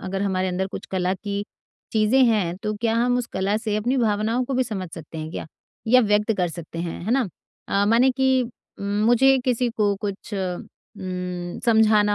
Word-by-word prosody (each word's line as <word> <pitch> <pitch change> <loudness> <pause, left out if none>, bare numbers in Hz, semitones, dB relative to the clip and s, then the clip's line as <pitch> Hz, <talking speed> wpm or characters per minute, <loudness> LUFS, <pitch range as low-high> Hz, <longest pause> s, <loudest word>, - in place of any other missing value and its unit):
अगर 195 +1 -3
हमारे 185 -1 0
अंदर 185 +1 -1
कुछ - - -8
कला 185 0 0
की 200 +1 -4 0.5
चीज़ें 220 +5 +4
हैं, 200 -7 +1
तो 210 +2 -3
क्या 225 +1 0
हम 245 +1 +2
उस 245 - -2
कला 195 +2 0
से 215 -2 -1
अपनी 245 +5 0
भावनाओं 225 +1 +1
को 265 - -3
भी 260 - +3
समझ 190 -6 -4
सकते 160 -1 -9
हैं 155 0 -5
क्या? - - -5 0.4
या 255 +3 +6
व्यक्त 210 -1 +2
कर 180 -2 +1
सकते 165 0 -8
हैं, 170 -1 -4
है 220 - -2
ना? 250 -5 +2 0.4
अ, 200 0 +2
माने 240 +4 +5
कि 260 0 +2 0.4
उम, - - -6 0.2
मुझे 265 +3 +5
किसी 250 -1 +1
को 205 -2 +2
कुछ 200 +1 -5
उम, 180 -1 -5
समझाना 215 -2 +4
210 Hz, 195 wpm, -23 LUFS, 185-235 Hz, 0.5 s, या